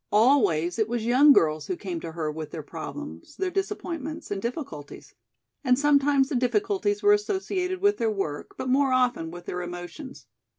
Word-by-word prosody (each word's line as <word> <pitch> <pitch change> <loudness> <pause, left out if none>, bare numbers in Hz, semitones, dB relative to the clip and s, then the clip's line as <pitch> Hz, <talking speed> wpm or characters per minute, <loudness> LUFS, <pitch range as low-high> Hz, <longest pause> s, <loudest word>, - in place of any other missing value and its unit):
Always 205 - +3
it 220 0 +1
was 235 -2 -2
young 260 +5 +6
girls 155 - +3
who 185 - -2
came 180 -4 -5
to 165 0 -7
her 160 -2 -2
with 155 0 -6
their 155 0 -7
problems, 80 - -8
their 380 -1 -2
disappointments 340 - -4
and 200 -1 -2
difficulties. 235 - -6 0.5
And 250 -2 +3
sometimes 280 -1 +3
the - - -2
difficulties 405 - 0
were 410 0 +6
associated 380 -3 -1
with 410 +1 +3
their 225 - +1
work, 195 -9 -4
but - - -4
more 270 +1 +3
often 245 -10 +1
with 175 +1 -10
their 180 - -4
emotions. 175 - -8
250 Hz, 175 wpm, -26 LUFS, -, 0.5 s, young